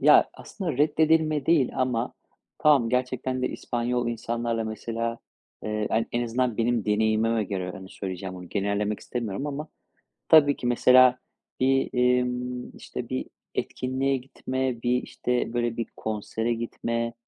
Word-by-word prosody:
ya, - - +6
aslında 180 -6 -5
reddedilme 155 -1 +3
değil 160 -6 +4
ama 125 -2 0 0.4
Tamam, 140 -6 +4
gerçekten 130 +1 -1
de - - +1
İspanyol 120 0 -2
insanlarla, 115 0 -2
mesela, 115 +1 -3 0.5
eee, 105 -1 -1
an 115 +1 +1
en 120 0 0
azından 120 0 0
benim 115 -2 +1
deneyimime 110 +1 +2
göre, 95 -2 -3
yani, 95 -1 -9
söyleyeceğim 95 -1 -5
bunu, 90 -1 -9
genellemek 100 +2 -1
istemiyorum 120 +1 -3
ama 150 +1 -4 0.6
tabii 145 -3 +7
ki 120 - -4
mesela 125 +1 +6 0.4
bir, 135 +1 +3
imm, 125 0 0
işte, - - -7
bir 65 0 -2 0.3
etkinliğe 135 +1 -1
gitme, 130 -1 -3
bir, 125 +1 +2
işte, 125 -2 -2
böyle, 120 -1 -1
bir 115 - -1
konsere 110 +2 -2
gitme, 115 0 -2
120 Hz, 135 wpm, -26 LUFS, 110-130 Hz, 0.6 s, tabii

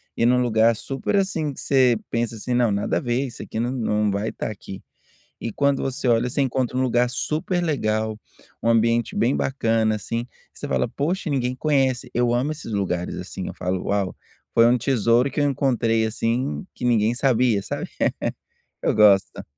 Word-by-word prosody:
e 115 - +1
num 125 +1 +4
lugar 115 -1 +3
super, 135 - -3
assim, 165 -7 0
que - - -11
você 130 -4 +3
pensa 115 -1 -1
assim: 125 +4 -3
"Não, 120 -2 +3
nada 100 0 -1
a - - +1
ver, 120 +2 0
isso 120 - -8
aqui 110 - -5
não 120 +2 0
não 105 -4 0
vai 100 +2 -2
estar - - -4
aqui", 95 -2 -9 0.6
e 115 - -4
quando 140 +3 +1
você 130 -1 -2
olha, 115 +1 +3
você 130 - -2
encontra 130 -1 -1
um 130 - +2
lugar 125 -1 +2
super 155 +7 -1
legal, 110 -8 -1 0.4
um - - +1
ambiente 115 0 +2
bem 120 +4 +2
bacana 115 -4 +1
assim, 115 +3 -4 0.3
você - - -7
fala: - - 0
"Poxa, 165 +3 -2
ninguém 125 -3 0
conhece," 135 -3 +1
eu 120 0 +2
amo 130 +5 0
esses 150 -7 -7
lugares 90 -3 -2
assim, 90 +1 -6
falo: 90 0 -3
"Uau, 100 -2 -1 0.4
foi 115 - +6
um 120 +1 +4
tesouro 120 +1 +2
que - - -2
eu - - +3
encontrei, 120 -4 +1
assim, 120 - -2
que - - -7
ninguém 115 -2 +3
sabia", 120 -5 +2
sabe. - - -5 1.0
Eu - - +1
gosto. 100 -3 +4
120 Hz, 185 wpm, -23 LUFS, 110-130 Hz, 1.0 s, foi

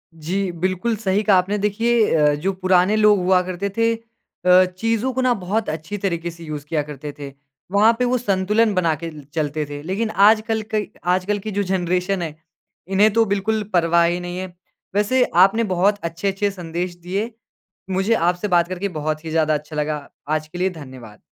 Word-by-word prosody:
जी, 180 +4 -2
बिल्कुल 185 +6 -1
सही 205 -1 0
कहा 205 -3 +5
आपने, 190 +3 +1
देखिए 220 +1 +2
अ, 150 -2 +4
जो 185 +7 -2
पुराने 185 +1 +2
लोग 210 -1 +5
हुआ 180 0 +3
करते 185 +2 -3
थे, 230 0 +3
अ, 185 -5 +1
चीज़ो 230 +4 0
को 260 - -1
ना 255 -1 +3
बहुत 210 +2 -2
अच्छी 160 +6 -5
तरीके 170 -4 -2
से 170 0 -13
यूज़ 150 -2 -6
किया 155 0 -1
करते 145 0 -7
थे। 140 -1 -7 0.4
वहाँ 210 +3 +5
पे 250 - +2
वो 250 +1 +1
संतुलन 210 0 +1
बना 175 -4 +2
के 165 +2 -6
ल 150 -2 -11
चलते 155 -1 -1
थे, 145 0 -6
लेकिन 200 +7 -2
आजकल 215 +3 +3
कै 210 -1 0 0.3
आजकल 200 +3 -1
की 215 +2 -6
जो 205 0 0
जेनरेशन 185 0 -1
है, 160 -3 -4 0.5
इन्हें 200 +3 +4
तो 225 0 +4
बिल्कुल 210 +2 0
परवाह 170 -1 +4
ही 175 +1 0
नही 175 0 -6
है। 185 0 -4 0.5
वैसे 220 +5 +3
आपने 195 +6 +5
बहुत 200 +3 +2
अच्छे-अच्छे 195 +5 -1
संदेश 175 -1 -5
दिए, 190 +6 -3 0.6
मुझे 190 +4 +1
आपसे 175 +1 0
बात 175 -2 +3
करके 185 +2 -3
बहुत 155 +1 -3
ही 160 - -5
ज़्यादा 155 -1 +2
अच्छा 150 +1 -6
लगा। 150 -1 -2 0.2
आज 155 0 -1
के 175 - -8
लिए 185 +1 +1
धन्यवाद। 130 - -11
185 Hz, 190 wpm, -21 LUFS, 165-210 Hz, 0.6 s, कहा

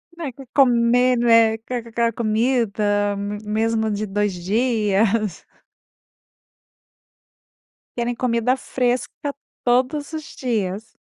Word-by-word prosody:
Não 335 -1 -6
é 275 - -4
que 270 +1 -13
comer 245 -1 +4
não 240 0 +1
é 225 -1 +5
que 225 +3 -9
aquela 235 -1 -1
comida 215 -3 +1
me 205 +1 -4
mesmo 220 +1 0
de 210 +1 -2
2 205 0 -1
dias. 210 0 0 2.5
Querem 240 0 -1
comida 240 0 +1
fresca 255 +3 -2 0.3
todos 260 +5 +1
os 310 -1 -7
dias. 215 -4 -3
230 Hz, 110 wpm, -21 LUFS, 210-250 Hz, 2.5 s, é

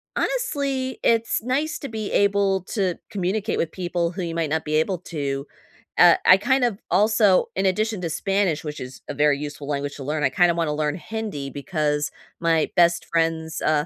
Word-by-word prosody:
honestly, 280 - -1
it's 230 -1 +2
nice 290 +7 -1
to 280 - -6
be 220 -2 -4
able 200 -2 +2
to 185 -3 -1
communicate 200 +3 -1
with 165 - -1
people 175 -2 -2
who 185 - -5
you 165 -1 -3
might 165 -3 -1
not 160 0 -1
be 155 0 -1
able 180 +5 +1
to. 140 -5 -4 0.5
Uh, 175 -1 +8
I 185 - +8
kind 265 +5 +1
of 230 -5 0
also, 210 +1 +4
in 190 - 0
addition 215 +1 0
to 170 - -2
Spanish- 190 0 0
which 150 -1 -6
is 130 0 -8
a - - -2
very 145 0 +3
useful 145 -1 -6
language 145 0 -3
to 140 - -8
learn, 150 +2 -2
I 135 - +4
kinda 175 +5 +3
wanna 165 -3 0
learn 150 -1 -1
Hindi 195 -7 -5
because 150 0 -1 0.3
my 165 -2 +2
best 170 -1 +3
friend's, 165 0 -1
uh, 150 -1 +2
175 Hz, 190 wpm, -23 LUFS, 150-205 Hz, 0.5 s, Uh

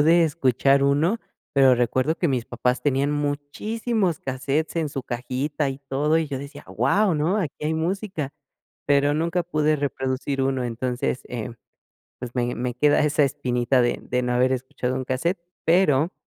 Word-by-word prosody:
pude 165 +3 +5
escuchar 140 -3 +2
uno, 155 +11 +2 0.3
pero 135 -2 +6
recuerdo 130 +6 +1
que 175 - 0
mis 125 -4 0
papás 125 +1 -1
tenían 140 0 +1
muchísimos 170 - -1
cassette 135 +5 -2
en 160 -2 0
su 135 -2 -5
cajita 130 +5 -2
y 135 0 -5
todo, 150 +4 +2
y 165 - -1
yo 140 -2 -4
decía: 140 +2 -9
"¡Guau!, 205 -3 +2
¿no?, 160 +7 +1
aquí 150 -7 -3
hay 155 +1 0
música", 170 -3 -2 0.5
pero, 145 0 +3
nunca 170 +3 0
pude 155 -2 +1
reproducir 135 -1 -2
uno. 130 -1 0
Entonces, 125 +2 -2
eh, 120 -2 -5 0.7
pues, 120 -1 -7
me 120 0 0
me 125 0 -2
queda 145 +3 +4
esa 150 0 +3
espinita 125 -1 +1
de 120 - +1
de 125 0 -1
no 125 - 0
haber 125 +1 +3
escuchado 130 0 -3
un 130 - -2
cassette, 165 +9 -1 0.3
pero, 165 -2 +3
140 Hz, 165 wpm, -24 LUFS, 130-160 Hz, 0.7 s, pero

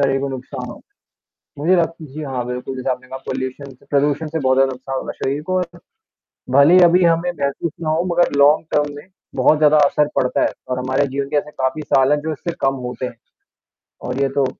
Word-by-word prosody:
तकरीबन 135 0 +1
नुकसान 130 -1 -6
होता - - -13 0.5
है। - - -26
मुझे 185 +4 +4
लगता 165 -1 -1
है 145 - -12
जी 155 - -6
हाँ, 130 -4 -3
बिल्कुल 125 +1 -5
जैसा 130 +1 -2
आपने 125 0 -9
कहा 130 +1 -6
पॉल्यूशन 130 +1 -4
से - - -25
प्रदूषण 145 +2 +1
से, 160 +1 -3
बहुत 130 -1 +2
नुकसान 130 +1 -5
होगा - - -4
शरीर 140 +2 -3
को। 185 - +1
अत 175 -1 -7 0.7
भले 140 +6 +6
ही 185 - +8
अभी 175 +1 +5
हमें 170 +1 +2
ये - - -5
महसूस 140 +3 -2
ना 155 -2 -2
हों, 165 +3 +1
मगर 175 0 +2
लॉन्ग 150 +3 +5
टर्म 145 -1 +1
में 145 - -11 0.3
बहुत 135 +4 +3
ज़्यादा 150 0 +5
असर 150 +1 +1
पड़ता 125 - +1
है - - +3 0.2
और 125 0 -2
हमारे 130 +2 0
जीवन 140 +1 -3
के - - 0
ऐसे 145 - -1
काफ़ी 135 +2 -2
साल 135 0 +3
हैं 150 - +2
जो 160 +1 -3
इससे 170 +4 -5
कम 135 0 +2
होते 125 +1 -4
हैं। 120 - -8 0.9
और 130 - -3
ये 140 - +3
तो 135 - +4
140 Hz, 230 wpm, -19 LUFS, 130-155 Hz, 0.9 s, ही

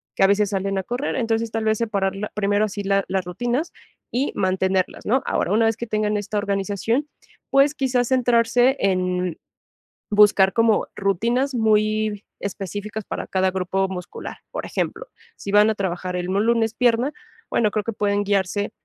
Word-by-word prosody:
que - - -3
a - - +7
veces, 200 0 +2
salen 195 0 -1
a 190 - -1
correr. 245 +8 -3
Entonces, 230 -2 0
tal 225 0 -2
vez 220 -1 +1
separar 200 -4 0
la 205 +2 -4
primero 205 +1 +2
así 205 -1 -5
la 195 0 +2
las 190 -2 -1
rutinas, 245 - -2 0.4
y 265 +4 0
mantenerlas, 190 0 0
¿no?, 255 +5 +2
ahora, - - 0
una 225 +2 +4
vez 225 0 +2
que 235 0 -5
tengan 215 -1 0
esta 205 +1 -3
organización, 205 +6 -1 0.4
pues, 275 +2 +4
quizás 255 -4 0
centrarse 245 0 +3
en 180 -2 0 0.7
buscar 205 -2 +5
como 225 -2 +3
rutinas 235 +8 0
muy 215 -2 +1 0.2
específicas, 205 +2 -5
para - - -5
cada 190 0 +1
grupo 190 +1 -1
muscular. 180 -2 -7 0.2
Por - - -4
ejemplo, - - -3 0.3
si 200 - -6
van 210 +1 +6
a 220 - 0
trabajar 185 -2 -3
el 180 0 -2
lunes 225 +4 +1
pierna, 245 +4 +2 0.4
bueno, 215 -2 +2
creo 215 - 0
que 230 - -2
pueden 205 0 +1
guiarse, 200 0 0
210 Hz, 170 wpm, -22 LUFS, 195-230 Hz, 0.7 s, a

